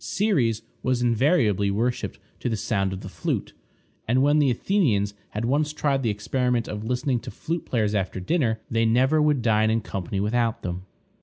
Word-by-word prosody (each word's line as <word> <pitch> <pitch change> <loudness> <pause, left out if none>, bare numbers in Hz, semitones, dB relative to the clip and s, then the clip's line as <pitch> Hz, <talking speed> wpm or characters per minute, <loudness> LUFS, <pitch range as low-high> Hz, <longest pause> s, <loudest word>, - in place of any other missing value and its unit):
Ceres 125 - +1 0.2
was 125 -1 0
invariably 115 - +2
worshiped 115 +5 -1 0.2
to - - -2
the 110 - -1
sound 100 -3 0
of 95 - -5
the - - -8
flute. - - -3 0.5
And 125 +4 +3
when 145 +2 +4
the 145 -2 +4
Athenians 120 - +1 0.2
had 105 +2 -3
once 150 +4 +1
tried 140 -3 0
the 120 - 0
experiment 120 +3 0
of 105 0 -5
listening 125 +2 0
to - - -8
flute 165 +1 -4
players 110 -4 0
after 95 -2 -1
dinner, 115 - 0
they 115 0 +1
never 130 +7 +3
would 150 -5 +2
dine 110 -1 +3
in 110 +1 +1
company 95 -1 -4
without 115 +2 0
them. 90 +1 -5
115 Hz, 180 wpm, -25 LUFS, 105-135 Hz, 0.5 s, when